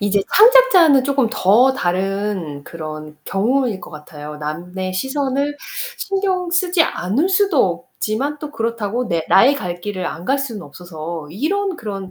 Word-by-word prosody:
이제 205 0 +2
창작자는 410 - +6
쪼끔 270 -4 +1
더 245 +4 +4
다른 190 - -2
그런 155 -2 -8
경우일 230 +1 0
것 - - -11
같아요. 150 -1 -9
남의 175 +5 -5
시선을 275 +6 -1 0.4
신경 380 -3 -1
쓰지 360 -1 +3
않을 245 - 0
수도 375 -9 +2
없지만 275 +8 -2
또 300 0 -7
그렇다고 230 -1 -2
내 165 -3 -1
나의 260 +8 +6
갈 175 -9 -5
길을 190 -1 -4
안 170 - -6
갈 275 +1 +2
수는 230 -8 -5
없어서 160 0 -8
이런 365 - -1
그런 195 -4 -6
215 Hz, 290 characters per minute, -19 LUFS, 180-285 Hz, 0.4 s, 창작자는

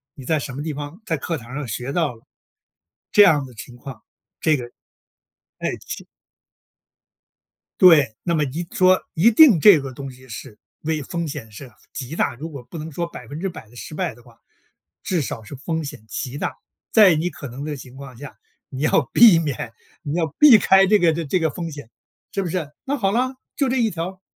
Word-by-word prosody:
你 135 - -11
在 155 +3 +1
什 135 -1 -6
么 145 - -5
地 155 -1 -3
方， 145 +5 -7
在 165 - 0
课 165 +4 -3
堂 120 -1 -11
上 145 -1 -4
学 125 +3 -4
到 160 -4 0
了。 115 - -22 0.9
这 210 - +6
样 150 -8 +4
的 130 - -13
情 120 +2 -11
况， 125 -2 -10 0.4
这 155 -2 +3
个 125 - -6 1.0
诶， - - -2
气 - - -7 1.7
对。 150 -11 +6
那 170 -1 0
么 155 - +2
一 150 +5 -4
说， 185 0 +4
一 200 +9 +4
定 235 - +7
这 190 0 +8
个 135 -1 -6
东 135 +1 -7
西 130 0 -16
是 110 -2 -9 0.2
为 155 0 -2
风 170 +4 -4
险 140 -7 -7
是 125 +4 -11 0.2
极 140 +3 -6
大， 120 - 0
如 155 +7 -7
果 140 -5 -9
不 165 - -10
能 160 +1 -6
说 170 +3 -3
100% 165 - -7
的 120 - -19
失 125 - -9
败 180 0 -2
的 120 - -19
话。 115 -1 -20 0.7
至 180 -4 0
少 120 -4 -5
是 105 - -11
风 160 +4 -3
险 140 -7 -8
极 125 +6 -5
大。 - - -3 0.4
在 205 -5 +7
你 165 +3 -1
可 140 -4 -9
能 135 +5 -7
的 150 -1 -3
情 130 -2 -12
况 140 -2 -10
下， 145 +2 -11 0.3
你 130 - -7
要 150 -3 +2
避 225 -8 +8
免 145 -8 -3 0.3
你 145 -2 -4
要 165 -2 +1
避 290 -7 +9
开 195 -1 +5
这 210 +2 +5
个 175 -4 +3
这 180 +6 +1
个 160 -1 +1
风 165 +2 -5
险， 145 -6 -10 0.4
是 200 - -1
不 185 - -3
是？ 160 -4 -3
那 280 +1 -1
好 195 -6 +1
了， 255 +4 0 0.2
就 275 - +2
这 255 - 0
一 230 -3 +2
条， 185 +1 -6
150 Hz, 220 characters per minute, -22 LUFS, 130-180 Hz, 1.7 s, 避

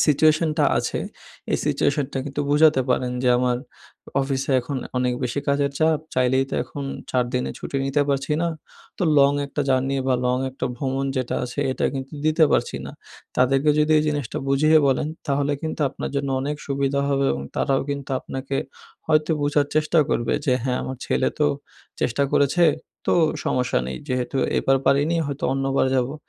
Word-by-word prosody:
সিচুয়েশনটা 155 +1 +3
আছে, - - -2 0.5
এই - - +2
সিচুয়েশনটা 140 -2 0
কিন্তু 145 +1 -4
বুঝাতে 150 -2 +5
পারেন 125 0 +1
যে, 125 - +2
"আমার 125 -1 +1
অ - - -21
অফিসে 135 0 -1
এখন 135 +3 -5 0.2
অনেক 125 -1 +1
বেশি 125 +4 -2
কাজের 140 0 +2
চাপ, 160 -1 +3 0.2
চাইলেই 130 +1 +2
তো - - -3
এখন 140 -1 -7 0.3
৪ 125 -1 +2
দিনের 125 - -1
ছুটি - - -5
নিতে 145 +1 +2
পারছি 140 +1 0
না। 170 - +1 0.5
তো - - -2 0.2
লং 140 0 +5
একটা 145 - -4
জার্নি 135 +1 +1
বা 130 - +3
লং 125 0 +2
একটা 130 - -4
ভ্রমণ 135 +1 -2
যেটা 130 -2 -1
আছে, 125 +3 -4
এটা - - -2
কিন্তু 135 +2 -5
দিতে 155 +1 +4
পারছি - - +1
না।" - - -8 0.4
তাদেরকে 135 +3 +3
যদি 150 +1 +3
এই - - +2
জিনিসটা 145 -6 -2
বুঝিয়ে 155 +3 +5
বলেন, 135 +2 +1 0.2
তাহলে 145 0 +1
কিন্তু 160 0 -4
আপনার - - -6
জন্য 140 0 -1
অনেক 145 +2 -2
সুবিধা 140 0 0
হবে 140 -1 +1
এবং 70 0 -4
তারাও 135 -2 +1
কিন্তু 140 -1 -5
আপনাকে 135 +1 -4 0.5
হয়তো 155 0 +2
বুঝার 145 0 +2
চেষ্টাও 155 +1 +3
করবে 120 - 0
যে, 130 - +2
"হ্যাঁ, 125 -1 0
আমার 130 - -5
ছেলে - - +1
তো - - +3 0.5
চেষ্টা 125 +4 +1
করেছে, 145 +5 +3 0.4
তো - - +4 0.3
সমস্যা 125 - +1
নেই। 65 0 -4
যেহেতু 125 +1 -2 0.2
এবার 135 - +3
পারিনি, 145 +5 +3
হয়তো 140 -1 -4
অন্যবার 135 0 +1
যাবো।" 125 +3 0
140 Hz, 175 wpm, -23 LUFS, 130-145 Hz, 0.5 s, বুঝাতে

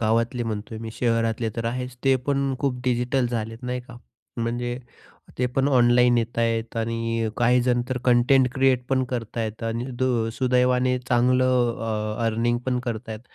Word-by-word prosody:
गावातले 115 +2 +1
म्हणतोय 110 0 -5
मी. 115 0 -6
शहरातले 115 -1 0
तर 115 - -3
आहेच, 125 +2 -3
ते 135 0 +5
पण 140 -1 +1
खूप 130 -3 -1
डिजिटल 125 +1 +1
झालेत, 115 0 -4
नाही 125 0 -3
का, 125 -1 -13 0.4
म्हणजे 120 +1 -2 0.6
ते 125 - +2
पण 135 +3 0
ऑनलाईन 125 -2 +4
येत 115 0 -3
आहेत 115 0 -1
आणि 115 0 -1
काहीजण 125 0 +3
तर 130 -1 -1
कंटेंट 125 +1 +4
क्रिएट 130 -2 +2
पण 130 -1 +2
करत 120 -3 -4
आहेत 110 0 -3
आणि 115 +1 -2
दु 120 -3 +1
सुदैवाने 125 0 +2
चांगलं 120 -3 +1
अ, 115 - -1
अर्निंग 115 +2 +1
पण 125 -1 +1
करता 115 -1 -4
आहेत. 110 - -7
120 Hz, 160 wpm, -24 LUFS, 115-125 Hz, 0.6 s, ते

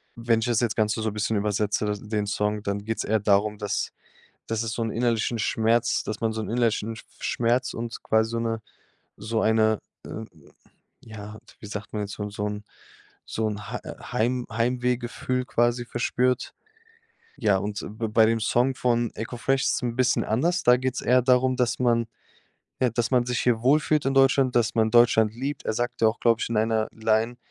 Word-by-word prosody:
Wenn 115 -1 +1
ich 115 - -1
das 120 -1 +1
jetzt 115 -2 -1
Ganze 110 0 +1
so 110 - 0
'n - - -7
bisschen 105 +1 -1
übersetze 105 0 0 0.2
den 105 -1 -1
Song, 105 +1 -1
dann 100 -1 -2
geht's 110 0 -2
eher 110 +1 +1
darum, 105 +1 +2
dass 105 0 -2 0.6
dass 115 0 -1
es 115 -1 -3
so 115 - -3
'n 115 - -2
innerlichen 115 0 0
Schmerz 115 +2 +1
dass 110 - -5
man 115 -1 0
so 110 - -3
'n 110 - -5
innerlichen 115 -2 0 0.2
Schmerz 120 +2 0
und 115 0 -6
quasi 110 +1 +2
so 115 - -1
'ne 115 -1 -1 0.6
so 110 +2 -2
eine, 110 -1 +3 0.3
äh, 110 - -6 0.8
ja, 110 -1 -9 0.2
wie - - -11
sagt 105 +1 -7
man 105 - -2
jetzt? 100 0 -6
So 105 - -5 0.2
'n 105 0 -5 0.6
so 110 0 -2
'n 105 -1 -5
Hei 125 - -3 0.3
Heim 125 +1 0
Heimwehgefühl 125 +2 -1
quasi 120 0 +1
verspürt? 125 +1 0 0.9
Ja, 105 -4 +3
und 100 +2 -4 0.2
b 115 - -1
bei 110 +1 +5
dem 115 0 +1
Song 125 +4 +2
von 120 -2 +1
Eko 115 +2 -5
Fresh 135 +2 +1
ist - - 0
'n 120 -1 -2
bisschen 130 -2 +2
anders. 170 - +1
Da 125 0 +6
geht's 130 0 -2
eher 125 +1 +4
darum, 125 0 +3
dass 125 -2 0
man 120 -2 +2 0.7
ja, 125 - +3
dass 115 0 -1
man 125 -1 +3
sich 125 -1 -1
hier 120 -2 +2
wohlfühlt 150 +2 +3
in 135 - +1
Deutschland, 135 -1 +4
dass 120 -2 +2
man 110 -1 +3
Deutschland 110 -2 +5
liebt. 135 +4 -4
Er - - +1
sagte 120 -1 0
auch, 110 - -3
glaube 115 -1 +3
ich - - -1
in 115 - -1
einer 110 0 +1
Line: 110 +2 0
115 Hz, 190 wpm, -25 LUFS, 110-125 Hz, 0.9 s, Da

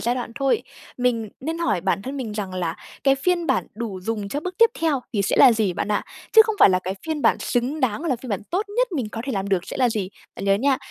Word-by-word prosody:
giai 240 +1 0
đoạn 245 -2 -4
thôi. 275 - +1 0.3
Mình 240 -3 0
nên 325 +4 -3
hỏi 310 - +1
bản 195 +1 0
thân 270 +5 -5
mình 235 -6 -4
rằng 195 -3 -4
là 170 -3 -2 0.3
cái 270 - +5
phiên 345 +5 0
bản 265 -4 +1
đủ 215 -5 -5
dùng 205 0 -3
cho 290 +7 -3
bước 365 +2 -5
tiếp 460 0 +6
theo 310 -5 +1
thì 200 -2 +1
sẽ - - 0
là 250 - +8
gì 215 -5 +1
bạn 175 - -3
ạ, - - 0 0.3
chứ 445 -1 +10
không 440 - -1
phải - - +8
là 185 - +3
cái 185 +1 -4
phiên 310 -2 -2
bản - - +4
xứng 260 +5 -1
đáng, 255 +5 0
là 265 -7 +1
phiên 250 +1 -10
bản 200 0 -2
tốt 395 +4 0
nhất - - +2
mình 255 -9 -2
có 225 - -6
thể 270 - -3
làm 195 -1 -2
được 190 -3 +1
sẽ - - -6
là 255 -2 +3
gì. 210 -5 -2 0.3
Bạn - - -5
nhớ 195 0 +4
nha, 270 +6 +2
245 Hz, 280 wpm, -23 LUFS, 200-290 Hz, 0.3 s, chứ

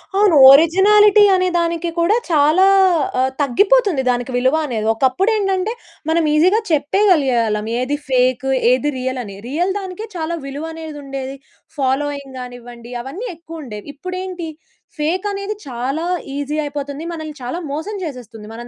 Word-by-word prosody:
అవును. 400 -4 +4 0.2
ఒరిజినాలిటీ 395 +8 +6
అనే 370 0 +1
దానికి 340 0 -1
కూడా 345 +6 +3
చాలా 310 +3 +4 0.6
ఆహ్, 260 +1 +2
తగ్గిపోతుంది 390 - +3
దానికి 245 +1 -1
విలువ 260 +4 +2
అనేది. 225 -6 -3
ఒకప్పుడేంటంటే, 385 - 0 0.4
మనం 330 +1 +2
ఈజీ‌గా 365 +8 +4
చెప్పేగలిగే 305 -2 +2
ఆళ్ళం. 210 0 -2
ఏది 255 +3 -1
ఫేక్, 255 0 +1 0.3
ఏది 255 +3 +1
రియలని. 255 -5 -4
రియల్ 340 +8 -1
దానికే 385 +3 -7
చాలా 335 0 -3
విలువనేది 315 +2 -7
ఉండేది. 270 -1 -6 0.4
ఫాలోయింగ్ 280 0 -2
గానివ్వండి, 245 -1 -10
అవన్నీ 355 - -6
ఎక్కువుండేవి. 310 -10 -9
ఇప్పుడేంటి, 365 +1 -6 0.5
ఫేకనేది 395 +6 -2
చాలా 265 +7 -3 0.3
ఈజీ‌ 285 +1 -3
అయిపోతుంది. 285 +1 -5
మనల్ని 310 -2 -7
చాలా 335 +9 -4
మోసం 320 +9 -4
చేసేస్తుంది. 235 -6 -9
మనం 240 +1 -8
300 Hz, 125 wpm, -18 LUFS, 260-365 Hz, 0.6 s, ఒరిజినాలిటీ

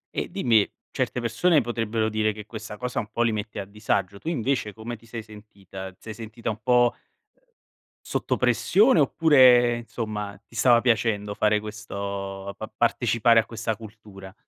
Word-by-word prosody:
E - - -2
dimmi, 120 - +2 0.2
certe 125 - -2
persone 145 +7 +3
potrebbero 115 -2 -1
dire 110 -1 0
che 105 -1 -9
questa 110 -1 -8
cosa 125 +2 -3
un 105 - -5
po' 120 +1 +1
li 115 - +2
mette 105 0 -4
a 100 - -4
disagio, 100 -1 -2
tu 160 - -4
invece 130 -6 -1
come 110 +3 -7
ti 115 +1 -19
sei 115 -1 -6
sentita? 100 -3 -10
Ti - - -28
sei 110 - -7
sentita 115 +1 -5
un 110 - -7
po' 120 -1 +4 1.1
sotto - - -1
pressione, 210 -2 +3
oppure 130 -5 +5
insomma, 105 -4 -5
ti 115 - -18
stava 120 +1 +5
piacendo 110 -4 +1
fare 105 0 +2
questo 100 -2 -6
pa 110 - -7
partecipare 115 0 +3
a 110 - +1
questa 115 -1 -3
cultura? 105 -3 -12
110 Hz, 165 wpm, -25 LUFS, 105-120 Hz, 1.1 s, oppure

